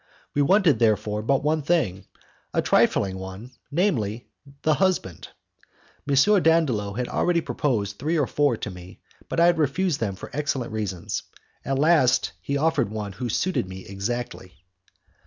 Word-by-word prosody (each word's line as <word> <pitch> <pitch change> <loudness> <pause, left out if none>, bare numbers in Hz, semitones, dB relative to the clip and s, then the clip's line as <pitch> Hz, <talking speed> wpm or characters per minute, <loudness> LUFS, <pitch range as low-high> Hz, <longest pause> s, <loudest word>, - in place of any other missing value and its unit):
We 145 - +1
wanted, 185 +1 +4
therefore, 105 -2 +1
but 135 +5 +1
one 155 +1 +1
thing 140 - 0 0.5
a - - +3
trifling 95 -1 +2
one, 95 +6 -8 0.2
namely, 120 - -1 0.3
the 155 - +3
husband. 180 - -1 0.8
M. 140 - +3 0.3
Dandolo 135 -12 +2
had 125 +3 -3
already 175 -1 +1
proposed 105 -12 -2
three 160 +5 0
or 145 - +2
four 145 -3 +1
to 105 - -5
me, 90 0 -12 0.3
but - - -1
I 170 - +6
had 170 -1 +3
refused 165 +1 +1
them 100 -4 -2
for - - -10
excellent 140 -4 -2
reasons. 105 -2 -3 0.4
At 135 - -1
last 145 -4 +3
he 140 - -2
offered 150 -5 +1
one 105 -1 -5
who 120 +6 -5
suited 180 - 0
me 95 0 -9
exactly. 100 -4 -5
125 Hz, 155 wpm, -24 LUFS, 100-155 Hz, 0.8 s, I